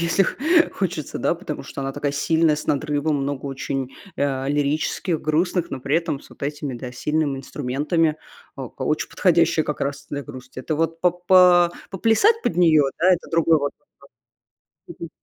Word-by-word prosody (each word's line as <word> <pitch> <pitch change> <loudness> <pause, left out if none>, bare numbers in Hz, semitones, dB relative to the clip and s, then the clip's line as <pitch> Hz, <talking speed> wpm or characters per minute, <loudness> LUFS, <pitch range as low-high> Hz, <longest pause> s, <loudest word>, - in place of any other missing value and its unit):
если 170 +3 +2 0.5
хочется, 175 -6 -3
да, - - +1
потому 165 -4 -6
что 140 - -7
она 135 0 -3
такая 145 0 -2
сильная, 160 +2 +2
с 150 - -7
надрывом, 150 +1 0
много 140 0 -3
очень, 135 -1 -4 0.3
а, 135 -1 -1
лирических, 150 +4 -1
грустных, 170 +3 0
но 135 - -5
при 140 +5 +1
этом 160 -5 -2
с - - -18
вот - - -17
этими, 145 -2 -4
да, 125 +1 -7
сильными 150 +1 -1
инструментами, 150 +5 -1 0.4
а, - - -6
ка - - -10
очень - - -1
подходящая - - +2
как - - -4
раз 140 0 -3
для 145 -1 -3
грусти. 130 -2 -10
Это 150 +3 -3
вот 165 +1 -1
по 180 - +4
по 175 0 +5 0.2
поплясать 225 - +3
под 170 - 0
нее, 160 -5 +5
да, 175 - +3
это 175 - -8
другой 165 -1 +3
вот 145 -1 -2 1.0
вопрос. - - -15
Мгм. 170 - -5
150 Hz, 175 wpm, -22 LUFS, 140-170 Hz, 1.0 s, по